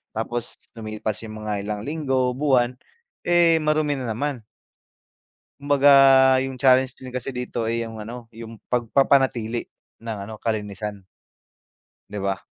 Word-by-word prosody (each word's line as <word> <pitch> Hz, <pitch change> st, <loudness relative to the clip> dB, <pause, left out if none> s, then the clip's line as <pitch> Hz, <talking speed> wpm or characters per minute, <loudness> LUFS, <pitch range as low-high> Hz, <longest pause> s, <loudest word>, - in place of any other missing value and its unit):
Tapos 120 Hz, +1 st, -3 dB, 0.2 s
lumipas 110 Hz, -1 st, -4 dB
yung 110 Hz, 0 st, -8 dB
mga 105 Hz, -1 st, -2 dB
ilang 105 Hz, -1 st, -3 dB
linggo, 135 Hz, -4 st, 0 dB
buwan, 130 Hz, -4 st, +2 dB, 0.5 s
eh, 170 Hz, -2 st, +4 dB
marumi 155 Hz, -1 st, +1 dB
na 125 Hz, -3 st, -4 dB
naman. 140 Hz, +1 st, -3 dB, 1.2 s
Kumbaga, 145 Hz, 0 st, +4 dB, 0.6 s
yung 135 Hz, -, -6 dB
challenge 130 Hz, 0 st, +3 dB
din 130 Hz, -, -8 dB
kasi 125 Hz, +1 st, -3 dB
dito, 125 Hz, -2 st, -3 dB
eh, 115 Hz, +1 st, -1 dB
yung 115 Hz, -1 st, -7 dB
ano, 115 Hz, +2 st, -9 dB
yung 115 Hz, -1 st, -11 dB
pagpapanatili 125 Hz, -1 st, +1 dB, 0.3 s
ng 115 Hz, -2 st, -6 dB
ano, 110 Hz, +2 st, -8 dB
kalinisan. 105 Hz, -2 st, -4 dB, 1.1 s
Di -, -, -8 dB
ba? 95 Hz, -1 st, -2 dB
120 Hz, 130 wpm, -23 LUFS, 110-135 Hz, 1.2 s, eh